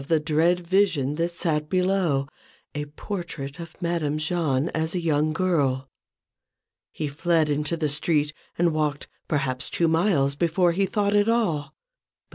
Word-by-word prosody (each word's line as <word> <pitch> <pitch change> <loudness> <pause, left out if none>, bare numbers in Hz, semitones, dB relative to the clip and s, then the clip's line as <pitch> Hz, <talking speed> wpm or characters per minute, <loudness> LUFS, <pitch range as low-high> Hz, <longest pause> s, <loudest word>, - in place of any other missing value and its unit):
93 150 +4 +1
the 150 - -4
dread 165 +3 +2
vision 170 -7 +2
that 165 +3 0
sat 155 -3 -1
below: 180 -7 +1 0.5
a 150 0 -3
portrait 150 -3 -6
of 170 -1 -9
Madame 165 -3 0
Jahn 155 -2 0
as 160 +2 -2
a - - +1
young 155 -2 +1
girl. 145 -7 0 1.0
He 155 - -3
fled 155 +1 +1
into 150 +3 0
the 155 -2 0
street, 150 +1 0 0.2
and 170 -1 +2
walked, 150 -2 -1 0.2
perhaps 130 -4 -1
two 170 - +1
miles, 160 -4 +2
before 170 +3 +2
he 195 +3 +1
thought 205 0 +1
at 205 +2 +3
all. 160 -11 0
160 Hz, 150 wpm, -25 LUFS, 145-175 Hz, 1.0 s, at